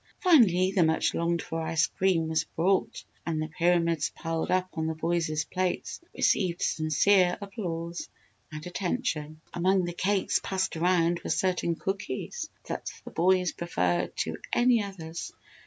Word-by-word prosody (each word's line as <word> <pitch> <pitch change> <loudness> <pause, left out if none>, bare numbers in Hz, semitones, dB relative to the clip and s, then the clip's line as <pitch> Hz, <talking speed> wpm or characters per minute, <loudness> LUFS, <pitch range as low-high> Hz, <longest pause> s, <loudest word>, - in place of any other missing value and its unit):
Finally, 200 - +5
the 190 -3 +3
much 160 0 +2
longed 170 0 0
for 165 0 -4
ice 160 -1 +2
cream 180 -4 +1
was 160 0 +1
brought 185 +4 0 0.2
and 160 -2 -2
the 155 - -2
pyramids 170 -1 +1
piled 165 -1 -2
up 185 0 +2
on 160 -1 -2
the 160 - -2
boys' 160 -2 0
plates 185 - -2
received 180 -4 +2
sincere 175 +4 +3
applause 175 -4 -5 0.4
and 155 0 -7
attention. 170 -5 -2
Among 185 +2 +2
the 175 - -4
cakes 195 +2 +1
passed 190 -2 -1
around 170 0 +2
were - - -4
certain 180 -2 +1
cookies 195 - -4 0.2
that - - -4 0.2
the - - -8
boys 180 +1 +3
preferred 90 - -1
to - - -3
any 240 -1 +4
others. 170 -5 -6
175 Hz, 145 wpm, -28 LUFS, 160-190 Hz, 0.4 s, Finally